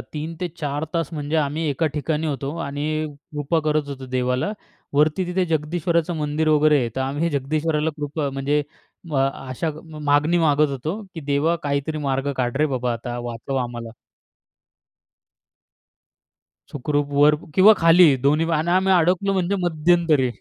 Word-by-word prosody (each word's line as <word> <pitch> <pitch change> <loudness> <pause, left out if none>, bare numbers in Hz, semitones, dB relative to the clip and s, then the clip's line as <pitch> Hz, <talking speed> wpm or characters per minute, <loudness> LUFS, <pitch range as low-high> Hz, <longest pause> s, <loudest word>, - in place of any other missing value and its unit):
3-4 155 -1 -4
तास 165 -3 0
म्हणजे 150 0 -2
आम्ही 150 +1 0
एका 145 +3 0
ठिकाणी 155 +1 -1
होतो 140 0 -3
आणि 140 +1 -5 0.5
कृपा 150 +2 0
करत 155 -1 0
होतो 135 -2 -7
देवाला. 125 +8 0 0.4
वरती 155 +5 +2
तिथे 180 +1 0
जगदीश्वराचं 165 +1 0
मंदिर 155 +1 -1
वगैरे 150 -1 +4
आहे 120 -3 0
तर - - -1
आम्ही 145 +5 -1
जगदीश्वराला 150 +2 0
कृपा 145 0 -3
म्हणजे 140 +2 0 0.5
अ, - - 0
आशा 135 +2 -1
म 160 -2 -11
मागणी 150 +4 +3
मागत 150 -2 +3
होतो, 150 - -4
की 165 - -6
"देवा, 145 +3 +1
काहीतरी 145 +2 -2
मार्ग 135 +1 -1
काढ 125 0 -1
रे 155 +2 +3
बाबा! 125 -3 -1
आता 120 +1 -5
वाचव 120 +3 -4
आम्हाला." 120 -1 -6 2.8
सुखरूप 145 +1 -1
वर 150 +1 +6 0.2
किंवा 195 +3 +8
खाली 165 +1 +7 0.2
दोन्ही 155 +3 +3
आणि 165 +3 -1
आम्ही 190 +1 +3
अडकलो 180 +3 +2
म्हणजे 190 +1 0
मध्यंतरी 160 -4 +2
150 Hz, 145 wpm, -22 LUFS, 140-165 Hz, 2.8 s, किंवा